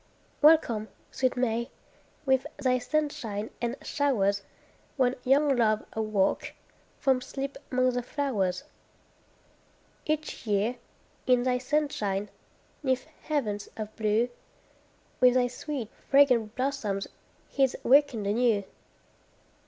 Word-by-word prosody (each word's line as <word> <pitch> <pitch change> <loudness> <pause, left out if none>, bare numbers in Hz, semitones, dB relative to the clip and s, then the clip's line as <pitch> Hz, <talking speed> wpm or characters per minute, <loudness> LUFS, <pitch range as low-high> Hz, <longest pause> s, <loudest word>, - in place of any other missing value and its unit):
Welcome, 290 -9 +5 0.2
sweet 255 -1 0
May! 235 -1 0 0.6
With 265 +1 +2
thy 255 -3 +1
sunshine 250 -6 -2
and 240 +1 -1
showers, 200 -9 +1 0.6
When 255 -2 +3
young 275 +2 +4
love 215 -3 +2
awoke 215 -3 0 0.4
From 265 -2 +2
sleep 275 +2 -5
'mong 255 0 +2
the 245 - -1
flowers. 220 -9 -1 1.4
Each 310 -6 -2
year, 210 +4 +1 0.5
in 250 -1 +4
thy 250 0 +1
sunshine, 245 -8 -1 0.5
'neath 260 -3 0 0.2
heavens 215 -10 -2
of 215 -1 -6
blue, 220 +2 +1 0.9
With 250 0 +6
thy 250 -1 +4
sweet, 250 -1 -5 0.2
fragrant 250 -6 +4
blossoms 255 -7 -2 0.4
he's 270 -2 +1
wakened 265 -5 +4
anew. 215 0 +2
250 Hz, 105 wpm, -28 LUFS, 215-275 Hz, 1.4 s, With